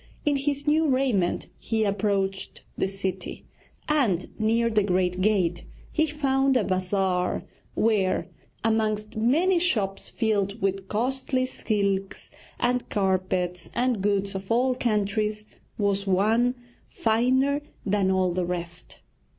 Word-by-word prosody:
In 295 -1 +3
his 285 +1 -1
new 310 +1 +3
raiment 255 -10 +1
he 220 -1 0
approached 200 -1 -1
the - - 0
city, 190 -1 -5 0.4
and 235 - +1
near 225 +2 +2
the 215 -1 +3
great 185 -2 0
gate 185 -4 +1 0.3
he 315 0 +2
found 270 -3 +2
a 235 - +2
bazaar 185 -1 0 0.3
where, 210 -4 +1 0.4
amongst 215 -1 0
many 315 +12 +3
shops 210 - 0
filled 210 -2 0
with 195 -1 -1
costly 255 +4 0
silks, 200 -6 -2 0.3
and 250 0 0
carpets, 185 -3 -1
and 245 -3 +1
goods 200 0 0
of 190 +2 -6
all 250 +3 +3
countries, 215 -2 0 0.3
was 200 -1 0
one 220 +6 +3 0.3
finer 260 +6 +2 0.2
than 200 -1 +2
all 185 -1 +2
the 180 0 0
rest. 175 0 -6
210 Hz, 120 wpm, -26 LUFS, 190-250 Hz, 0.4 s, In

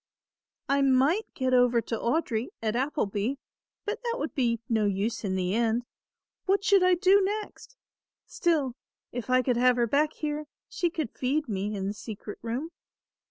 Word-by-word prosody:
"I 280 0 +2
might 275 +10 +3
get 260 -1 0
over 245 -1 +5
to 230 - -3
Audry 235 -2 0
at 220 0 -1
Appleby, 245 -3 -1 0.5
but 435 +3 -3
that 475 -1 -2
would - - -3
be 235 -4 +1
no 220 -2 +2
use 205 +4 -1
in 190 -2 -1
the 185 0 0
end; 230 +1 +1 0.6
what 395 +1 +2
should 400 -1 +5
I 365 0 +5
do 385 +3 +5
next? 425 +5 -4 0.5
Still 300 -7 0 0.4
if 245 0 -5
I 255 0 +4
could 250 -1 +1
have 250 0 +5
her 240 -1 +2
back 295 +6 +2
here, 300 0 -3 0.2
she 350 - -1
could 315 -8 -3
feed 285 +4 -1
me 205 0 -2
in 195 -1 -3
the 200 - -2
secret 210 -1 -8
room. 245 +9 -3
255 Hz, 170 wpm, -28 LUFS, 225-320 Hz, 0.6 s, over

